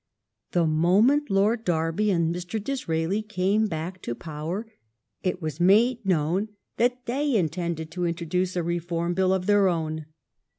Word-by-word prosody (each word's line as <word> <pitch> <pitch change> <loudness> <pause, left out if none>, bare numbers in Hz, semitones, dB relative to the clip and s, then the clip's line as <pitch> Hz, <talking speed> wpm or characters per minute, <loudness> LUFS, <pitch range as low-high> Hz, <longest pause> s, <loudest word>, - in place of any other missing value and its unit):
The 175 -2 +3
moment 195 - +3
Lord 210 +4 +2
Derby 165 +4 0
and 170 -3 +1
Mr. 180 +4 -4
Disraeli 200 -6 -1
came 210 +1 +1
back 175 +2 -5
to 120 - -4
power, 160 - -5 0.6
it 180 -1 -2
was 155 0 -4
made 225 +7 +4
known 180 +2 +1 0.3
that 250 +1 +1
they 275 +2 0
intended 170 -3 -1
to 180 -1 -1
introduce 175 +2 -1
a 175 - 0
Reform 170 0 -1
Bill 190 +1 +2
of 190 -1 0
their 205 -1 +4
own. 160 -3 -2
180 Hz, 145 wpm, -26 LUFS, 165-210 Hz, 0.6 s, made